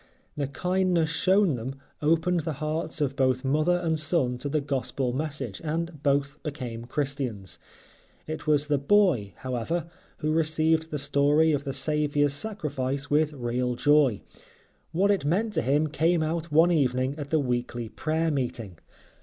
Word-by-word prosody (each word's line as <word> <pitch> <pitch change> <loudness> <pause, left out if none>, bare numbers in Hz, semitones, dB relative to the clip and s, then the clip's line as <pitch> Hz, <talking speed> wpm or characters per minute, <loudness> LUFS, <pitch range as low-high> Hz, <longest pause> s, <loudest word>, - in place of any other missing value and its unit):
The 145 -2 -2
kindness 180 +2 +1
shown 185 +2 +3
them 125 +2 -4 0.3
opened 165 +3 +2
the 160 0 -3
hearts 155 +2 -3
of 140 -2 0
both 130 -1 +1
mother 155 +6 +2
and 165 -3 -1
son 150 -6 0
to 145 - -3
the 155 +2 +1
Gospel 135 -2 -2
message 140 -6 -4
and 165 -1 -3
both 140 0 0
became 125 -6 -5
Christians. 125 - -3 0.7
It 155 0 -6
was 150 -1 +3
the 145 -2 +1
boy, 140 - +3
however, 130 +7 -3 0.3
who 155 0 -1
received 160 0 +1
the 150 - -3
story 145 +3 +3
of 145 -2 -1
the 135 - -2
Saviour's 145 +1 +1
Sacrifice 145 -8 -3
with 150 +1 +2
real 125 -1 -1
joy. 145 -4 +3 0.7
What 190 +5 +3
it 200 - +1
meant 200 +9 0
to - - +2
him 145 +5 +2
came 160 +3 +1
out 165 +1 -2
one 165 +4 +5
evening 130 -4 +1
at 145 -1 -5
the 160 - +2
weekly 120 -3 -2
prayer 160 +7 -1
meeting. 120 - -3
150 Hz, 155 wpm, -27 LUFS, 130-160 Hz, 0.7 s, one